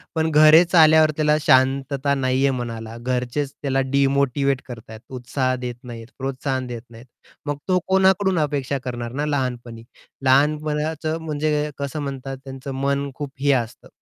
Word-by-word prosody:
पण 160 0 +1
घरेच 155 +4 +6
आल्यावर 155 -1 +6
त्याला 150 -1 +3
शांतता 135 +1 +2
नाही 130 0 +1
आहे, 135 - +3
मनाला 115 -2 -6
घरचेच 125 +3 -2
त्याला 135 -1 0
डिमोटिव्हेट 140 -1 +1
करत 115 -3 -10
आहेत, 110 0 -9
उत्साह 130 0 -2
देत 120 - -4
नाहीत. 115 -2 -9
प्रोत्साहन 130 -1 -3
देत 120 -2 -6
नाहीत. 115 +1 -14 0.4
मग 145 -1 -2
तो 185 -1 +3
कोणाकडून 190 -1 +3
अपेक्षा 140 -2 -1
करणार 120 -2 -5
ना - - 0
लहानपणी. 125 -5 -3 0.4
लहानपणाचं 150 +3 +1
म्हणजे 150 -1 -1
कसं 140 +1 -4
म्हणतात 135 -1 -5
त्यांचं 135 0 -8
मन 140 0 0
खूप 145 -2 -6
हे 140 +1 +2
असतं. 120 -2 -3
140 Hz, 150 wpm, -22 LUFS, 130-150 Hz, 0.4 s, घरेच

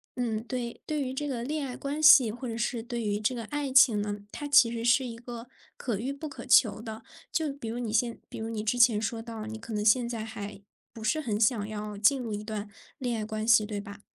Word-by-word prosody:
嗯， 225 -3 -2
对 240 -1 -5
对 300 -2 -1
于 260 -1 -4
这 290 +2 -3
个 245 -4 -3
恋 300 +3 -2
爱 250 - -6
关 285 +2 -4
系， 270 -7 +8
或 245 +2 -6
者 225 0 -4
是 235 0 -1
对 235 0 -4
于 205 -1 -1
这 230 +4 0
个 230 - -4
爱 285 +3 -3
情 245 -5 +6
呢， 205 0 -4
它 290 - -5
其 260 -5 +6
实 230 -1 -4
是 250 +2 +4
一 235 -2 -6
个 235 0 -9 0.3
可 220 -6 -2
遇 260 +4 -2
不 280 +3 -6
可 275 -2 -9
求 225 -3 +5
的， 220 -1 -8 0.3
就 310 -3 -1
比 275 -5 -8
如 230 - -4
你 235 -3 -3
现 230 +1 +1
比 - - -8
如 225 +1 -4
你 215 -2 -3
之 240 +3 0
前 235 -3 +6
说 225 +1 -3
到 225 -2 -7
你 220 0 -6
可 225 - -10
能 210 0 -2
现 235 +2 +4
在 225 -2 -4
还 205 -3 -8 0.3
不 225 - -10
是 285 +9 +1
很 215 -6 -2
想 215 -2 +2
要 210 -1 -5
进 225 +7 +3
入 230 -4 -4
一 205 - -4
段 210 -1 -5 0.3
恋 245 -3 -2
爱 215 - -3
关 215 0 -4
系， 220 -2 +5
对 205 -1 -4
吧？ 200 0 -10
230 Hz, 275 characters per minute, -28 LUFS, 215-255 Hz, 0.3 s, 系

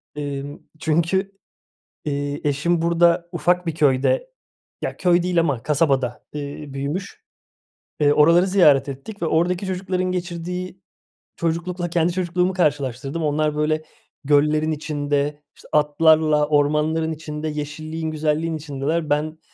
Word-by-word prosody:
Emm, 145 -1 -5 0.2
çünkü, 170 +5 +1 0.7
eee, 145 0 -2
eşim 155 +4 +1
burada 170 0 +3
ufak 180 0 +1
bir 165 - -2
köyde 155 - +2 0.5
ya, - - -4
köy 175 -1 +3
değil 180 -1 +1
ama 140 -8 0
kasabada, 135 -5 0
eee, 145 0 -6
büyümüş, 145 +8 -4 0.8
eee, 145 -1 +4
oraları 170 +5 +5
ziyaret 150 -8 +4
ettik 140 +11 -8
ve - - 0
oradaki 175 +4 +1
çocukların 185 0 -1
geçirdiği 180 +1 -4 0.5
çocuklukla 175 +2 -2
kendi 170 0 +1
çocukluğumu 180 0 0
karşılaştırdım. 145 -2 -1
Onlar 150 0 0
böyle, 155 +1 0 0.4
göllerin 150 +2 +3
içinde, 145 -1 -2
işte, - - -17
atlarla, 150 0 +4
ormanların 150 +2 +1
içinde, 155 0 -5
yeşilliğin, 155 +2 -4
güzelliğin 155 +1 -1
içindeler. 150 +2 -2
Ben, 155 +2 -1
155 Hz, 120 wpm, -22 LUFS, 145-175 Hz, 0.8 s, oraları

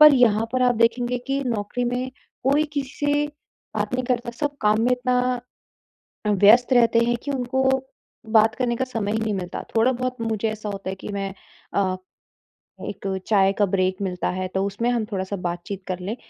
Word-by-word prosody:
पर 300 -1 +10
यहाँ 225 -3 +4
पर 255 0 +2
आप 245 -1 +4
देखेंगे 240 +2 +2
कि 275 +1 0
नौकरी 230 +1 -1
में 250 +1 -1 0.3
कोई 280 +4 +3
किसी 275 -2 -2 0.2
से 290 0 +2 0.5
बात - - -1
नहीं 255 0 0
करता, 240 -1 -1
सब 285 +4 -3
काम 210 +1 +3
में 245 - +2
इतना 250 0 +1 0.9
व्यस्त 210 +5 +6
रहते 235 -1 +5
हैं 240 0 +2
कि 285 - -2
उनको 260 0 0 0.7
बात 220 0 +5
करने 245 -2 0
का 260 - -1
समय 225 -5 -2
ही 220 - 0
नहीं 220 -1 -1
मिलता, 180 -2 -4
थोड़ा 230 +3 +4
बहुत 255 0 -2
मुझे 225 -1 0
ऐसा 215 -1 -5
होता 195 -2 -5
है 190 - -3
कि 190 - -10
मैं 195 -1 -3 0.4
अ, 190 -2 +1 0.9
एक 200 -1 -6 0.2
चाय 195 -2 +4
का 205 0 +2
ब्रेक 185 0 +1
मिलता 180 -3 -1
है, 185 0 -2
तो 190 +1 -1
उसमें 210 +5 -1
हम 235 -3 +1
थोड़ा-सा 190 0 -2
बातचीत 180 +3 -6
कर 185 -1 -3
लें, 195 +6 -4
230 Hz, 190 wpm, -24 LUFS, 200-250 Hz, 0.9 s, पर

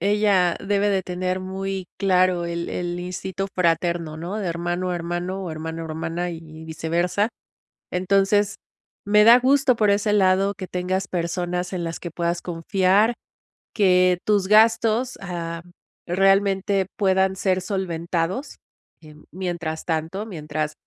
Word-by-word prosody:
ella 200 -3 +2
debe 205 +1 +1
de 195 -1 +1
tener 185 +1 -2
muy 190 0 -4
claro 185 -2 +2
el 170 0 -3
el 175 0 -3
instinto 185 +2 -4
fraterno, 170 -2 0
¿no?, 180 +6 -4
de 205 - -3
hermano 175 +2 -2
a - - -1
hermano 175 +3 -3
o 175 - -5
hermano 160 +1 -5
a - - -5
hermana 165 +3 -3
y 165 - -7 0.3
viceversa. 170 +6 0 0.6
Entonces, 195 +3 +2 0.5
me 210 +1 +5
da 235 +2 +9
gusto 265 0 +3
por 210 -3 +3
ese 205 +1 +1
lado 195 0 +3
que 190 - -6
tengas 185 +1 -2
personas 180 +1 -2
en 180 -2 -3
las 165 0 -4
que 175 - -6
puedas 170 +1 -2
confiar, 190 +5 +2 0.6
que 180 -3 +4
tus 200 -3 +2
gastos, 225 +3 +4
ah, 170 -2 -5 0.5
realmente 195 +1 +2
puedan 190 -1 +2
ser 185 -1 +1
solventados, 180 - -3 0.4
em, 155 -1 -15
mien - - -20
mientras 170 -3 -4
tanto, 165 +5 -2
mientras 155 -5 -4
185 Hz, 140 wpm, -23 LUFS, 170-195 Hz, 0.6 s, da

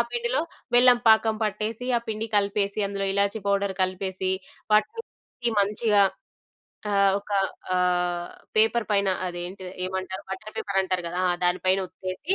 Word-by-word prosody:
పిండిలో 480 +1 0 0.3
బెల్లం 245 0 +7
పాకం 220 0 +5
పట్టేసి, 215 +3 -2
ఆ - - +4
పిండి 220 +1 -2
కలిపేసి, 200 0 0
అందులో 200 0 -3
ఇలాచి 200 +2 +1
పౌడర్ 200 -1 +1
కలిపేసి, 185 0 -2 0.4
వాటిని 425 - +3
కలిపి 240 -1 -6
మంచిగా 205 0 +3 0.9
ఆహ్, 200 -1 +4
ఒక 205 - -15 0.4
ఆహ్, 180 -1 +1 0.3
పేపర్ 225 +1 +3
పైన 200 -1 +2 0.2
అది 175 -1 -5
ఏంటిది 185 0 -8
ఏమంటారు? 190 0 -4
బటర్ 200 +3 -6
పేపర్ 200 -1 -1
అంటారు 185 -1 -1
గదా 175 +2 -4
ఆ! - - +3
దాని 180 +1 +2
పైన 185 +1 +4
ఒత్తెసి, 185 - -3
200 Hz, 145 wpm, -25 LUFS, 185-215 Hz, 0.9 s, బెల్లం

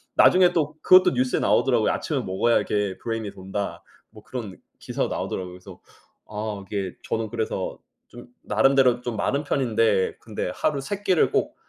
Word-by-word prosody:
나중에 180 -1 +6
또 155 -3 0
그것도 185 0 +6
뉴스에 125 0 0
나오더라고요. - - +2
"아침을 - - -2
먹어야 95 +6 +2
이게 105 -2 -2
브레인이 115 -3 -3
돈다." 95 -2 -5 0.3
뭐 110 -1 -16
그런 110 -8 -7 0.2
기사가 - - -2
나오더라고요. 90 -1 -4
그래서 90 0 -13 0.5
아 105 -2 -5
이게 95 -2 -4
저는 110 -1 -2
그래서 110 -4 -3 0.3
좀 120 0 -12 0.2
나름대로 125 +3 +3
좀 120 -2 -4
마른 140 +7 -1
편인데 115 -8 +1
근데 105 -5 -4
하루 145 -3 0
3 200 +8 -5
끼를 185 -5 +3
꼭 - - 0
115 Hz, 365 characters per minute, -24 LUFS, 100-135 Hz, 0.5 s, 나중에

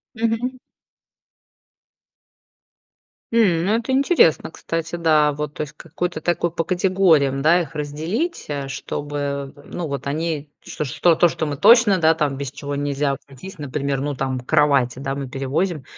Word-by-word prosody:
Мгм. 230 +3 -1 2.8
М. 185 -7 +3
Ну, 205 - +2
это 235 +3 -2
интересно, 265 - +3
кстати, 165 0 -4
да, 155 -3 +3
вот, 150 0 -5
то - - -4
есть 150 -3 -5
какой-то 170 0 -4
такой 175 0 0
по 165 - -1
категориям, 175 -6 +2
да, 165 +5 +4
их 165 -2 -7
разделить, 160 - -3
э, 140 -2 -3
чтобы, 140 0 -4
ну, 175 -3 -5
вот 140 -1 -5
они, 150 0 -3
что 155 +4 +1
то, 175 - +5
что 160 - -3
мы 145 -2 -3
точно 220 - +6 0.3
без 135 -1 -5
чего-нибудь 145 0 -4
нельзя 140 0 0
обойтись. 140 +7 -9
Например, 140 0 -2
ну 145 0 -2
там, 130 -1 -2
кровати, 135 -2 +2
да, 135 +1 -3
мы 140 - -4
там 135 - -7
перевозим, 145 +5 -2
150 Hz, 145 wpm, -21 LUFS, 140-175 Hz, 2.8 s, точно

